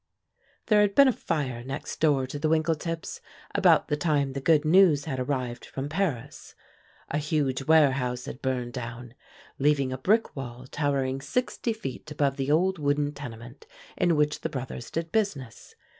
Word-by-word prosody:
There 210 -2 +4
had 205 -1 +2
been 280 -1 +8
a - - +5
fire 135 - -3
next 135 +2 -6
door 145 -4 +3
to 140 +3 -6
the 155 +1 0
Winkletips 160 +1 -1 0.3
about 180 -6 +4
the 150 - 0
time 145 -3 0
the 140 - -4
good 155 +1 +3
news 160 -3 +5
had 135 -5 -3
arrived 125 -2 -3
from 135 +1 -5
Paris; 160 -8 -3 0.6
a 145 - 0
huge 145 -3 -1
warehouse 130 -6 +3
had 125 - -8
burned 125 -2 -2
down, 120 -1 -7 0.5
leaving 140 -2 +2
a 130 - -5
brick 215 +11 +2
wall 125 -2 -7
towering 135 -1 -1
sixty 245 - -1
feet 155 - -6
above 145 -2 0
the 135 0 -2
old 180 +4 +2
wooden 145 0 0
tenement 120 -2 -10 0.3
in 175 -2 +2
which 150 0 +1
the 160 - -2
brothers 130 -4 -6
did 165 0 -4
business. 155 - -3
145 Hz, 165 wpm, -27 LUFS, 130-160 Hz, 0.6 s, been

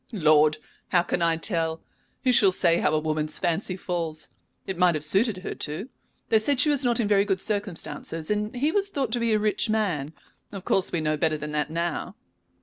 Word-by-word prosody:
"Lord! 155 -6 +4 0.3
how 175 -2 +3
can 175 - -2
I 165 -1 +2
tell? 165 -3 -1 0.4
Who 255 - +3
shall 205 -5 +5
say 170 -2 +2
how - - +2
a 155 - +2
woman's 155 0 -2
fancy 180 +2 -1
falls? 165 -4 -3 0.4
It 190 - -4
might 180 -2 +4
have 150 - -3
suited 195 +4 +1
her - - -4
too. 155 - -4 0.4
They 220 - +4
said 260 +4 0
she 300 - +4
was 285 -2 +2
not 240 -2 +1
in 225 - +1
very 200 -1 +4
good 195 -2 -1
circumstances, 200 -5 -3
and 210 +2 -2
he 285 +5 +1
was 400 +1 0
thought 270 - -2
to 240 - 0
be 230 -1 +1
a - - +4
rich 215 +1 0
man. 180 -10 -1 0.4
Of 195 -2 -8
course 190 - +1
we 170 - -1
know 155 0 0
better 155 0 +1
than 150 0 -6
that 150 0 -1
now." 170 +3 -3
185 Hz, 215 wpm, -25 LUFS, 160-215 Hz, 0.4 s, shall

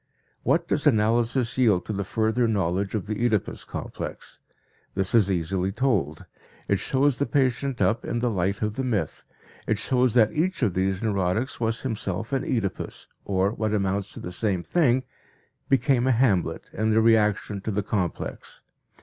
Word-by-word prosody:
What - - +1
does 150 0 +1
analysis 120 +1 +2
yield 105 -8 +3
to 110 - -3
the 100 0 -2
further 110 +4 +1
knowledge 95 -1 0
of 100 -4 -2
the 110 +2 -3
Oedipus 110 -5 0
complex? - - -7 0.6
This 95 -1 -1
is 110 -5 +4
easily 95 +1 0
told. 95 - 0 0.4
It 100 - +2
shows 135 +4 +1
the 140 - +1
patient 135 -3 +1
up 110 +5 +1
in - - -2
the 120 0 0
light 100 +1 -1
of 105 0 -2
the 135 - -1
myth; 105 - -2 0.4
it 110 - +1
shows 125 +2 +1
that 110 -3 +4
each 175 -1 0
of 105 -6 +2
these 95 +2 0
neurotics 100 +4 0
was 115 0 -1
himself 110 -2 -3
an 135 - +1
Oedipus 110 -7 -3 0.2
or, 95 0 +1
what 110 -1 -1
amounts 100 0 -1
to - - -8
the 90 - -6
same 95 -1 -1
thing, 130 - +2 0.7
became 130 -1 +3
a - - +4
Hamlet 115 -8 +1
in 110 +2 0
the 110 0 +4
reaction 105 -3 +2
to 110 - -4
the 105 -1 -1
complex. 95 -5 -4
110 Hz, 170 wpm, -25 LUFS, 95-120 Hz, 0.7 s, is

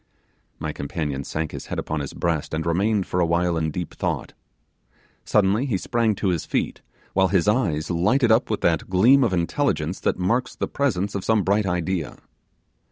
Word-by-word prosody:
My 75 +3 -4
companion 70 -2 -3
sank 80 +3 -3
his - - -7
head - - -4
upon 80 - -2
his 70 - -5
breast, 80 -3 -1
and 80 0 -2
remained 100 +4 +1
for 90 - -2
a 85 - +4
while 85 +1 +1
in 80 -1 0
deep 85 +2 -5
thought. - - -3 0.9
Suddenly 105 +5 +2
he 110 -7 0
sprang 115 +1 0
to 95 0 -1
his 85 -4 0
feet, - - -2 0.3
while 95 0 +3
his 95 -2 +1
eyes 90 -9 +1
lighted 115 +9 +2
up 110 +2 +3
with 110 - -1
that 85 0 +1
gleam 120 +9 +5
of 115 - +2
intelligence 90 - 0
that - - 0
marks 115 +8 0
the - - -2
presence 100 -8 -1
of 100 - -3
some 110 -2 +2
bright 100 +2 +1
idea. 90 -2 -2
90 Hz, 185 wpm, -23 LUFS, 80-110 Hz, 0.9 s, gleam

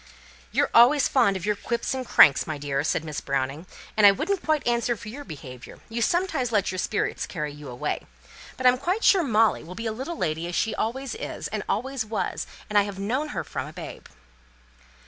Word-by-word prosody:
"You're - - +1
always 255 +5 +6
fond 200 -7 +3
of 180 - -6
your 210 0 +1
quips 235 +5 -2
and 260 -1 -3
your - - -14
cranks, 140 - +7
my 155 -2 -3
dear," 140 -1 -2
said 155 - 0
Miss 150 -2 -4
Browning, 140 +5 -2 0.3
"and 215 - +2
I 205 - +11
wouldn't 385 - -1
quite 310 -2 +1
answer 235 0 +1
for 210 - -9
your 280 +6 -8
behaviour: 130 - -10
you 235 +1 -3
sometimes 320 -5 +1
let 205 -5 +1
your 185 - -4
spirits 210 - -1
carry 150 -4 -4
you 145 -2 -10
away. 120 0 -3 0.5
But 255 - -4
I'm 250 0 +6
quite 365 - -1
sure 385 - +6
Molly 225 -7 +2
will 180 +3 -9
be 230 - -6
a 220 - 0
little 270 +9 -5
lady 160 +2 -2
as 175 - -4
she 225 - +1
always 265 +4 -3
is, 450 - -5
and - - -3
always 265 -1 -1
was, 220 0 -3 0.2
and 210 -1 +4
I - - +5
have 200 -1 -4
known 245 +10 -1
her 295 - -4
from - - -5
a - - -10
babe." - - -9
220 Hz, 220 wpm, -25 LUFS, 165-265 Hz, 0.5 s, I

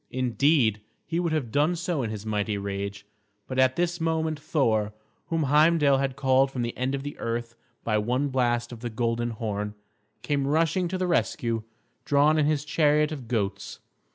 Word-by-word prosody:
Indeed, 125 -2 +2 0.2
he 165 - -2
would 170 -2 0
have 145 -8 -1
done 150 +8 +2
so 170 -3 -2
in 115 - -2
his 110 -1 -6
mighty 105 -1 -1
rage; 100 0 -4 0.4
but 130 0 -3
at 130 0 +4
this 175 0 -1
moment 160 -1 0
Thor, 110 -9 +1 0.3
whom 165 -2 0
Heimdal 150 -1 +4
had 135 -1 -1
called 135 0 +3
from 125 -2 -3
the 120 - -3
end 130 +2 -1
of 135 - -5
the 145 - -6
earth 115 0 -3 0.3
by 110 -2 +1
one 125 +6 0
blast 120 -2 0
of 120 - -8
the 120 +1 -4
golden 120 +1 -1
horn, 105 -2 -4 0.5
came 140 -2 0
rushing 165 +4 +2
to 185 +2 -3
the 185 - -1
rescue, 115 -9 0 0.4
drawn 145 +2 +3
in 150 - +3
his 150 -1 0
chariot 150 0 +2
of 135 -6 -6
goats. 100 -4 -2
130 Hz, 180 wpm, -26 LUFS, 115-150 Hz, 0.5 s, at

